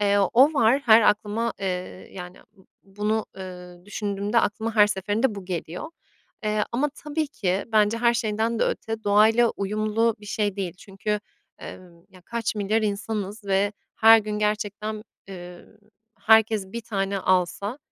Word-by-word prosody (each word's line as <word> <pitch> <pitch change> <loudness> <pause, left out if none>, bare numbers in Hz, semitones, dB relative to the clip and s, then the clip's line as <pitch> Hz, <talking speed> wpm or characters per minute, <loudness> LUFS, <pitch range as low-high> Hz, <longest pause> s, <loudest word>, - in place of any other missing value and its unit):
Eee, 205 0 +3
o 275 +6 +5
var, 255 0 +4
her 220 0 +7
aklıma, 215 +2 +1
eee, 195 - -3 0.5
yani, 180 -1 -9
b 195 -3 -24 0.2
bunu, 210 +3 -2
eee, 180 -2 -10
düşündüğümde 205 +2 -1
aklıma 220 +2 -2
her 210 -2 +6
seferinde 210 +4 -1
bu 200 -2 -8
geliyor. 180 - -5 0.5
Eee, 210 0 +1
ama 265 +5 +1
tabii 305 +1 -3
ki, 195 -8 -2
bence 215 +1 +3
her 235 0 +3
şeyden 225 0 -1
de - - +2
öte 225 0 -3
doğayla 220 +3 +4
uyumlu 215 +3 0
bir 210 - -12
şey 205 -1 -1
değil. 190 -4 -3
Çünkü, 210 +2 -4 0.4
emm, 175 -2 -12
ya, 185 - -17
kaç 230 +1 -3
milyar 210 +2 0
insanız 210 0 -3
ve 200 +1 +1 0.2
her 225 0 +7
gün 210 -1 -4
gerçekten, 210 0 -2 0.3
eee, 180 -2 -10 0.5
herkes 220 -2 +4
1 235 - -4
tane 200 -3 -2
alsa, 185 +6 0
210 Hz, 150 wpm, -24 LUFS, 195-225 Hz, 0.5 s, her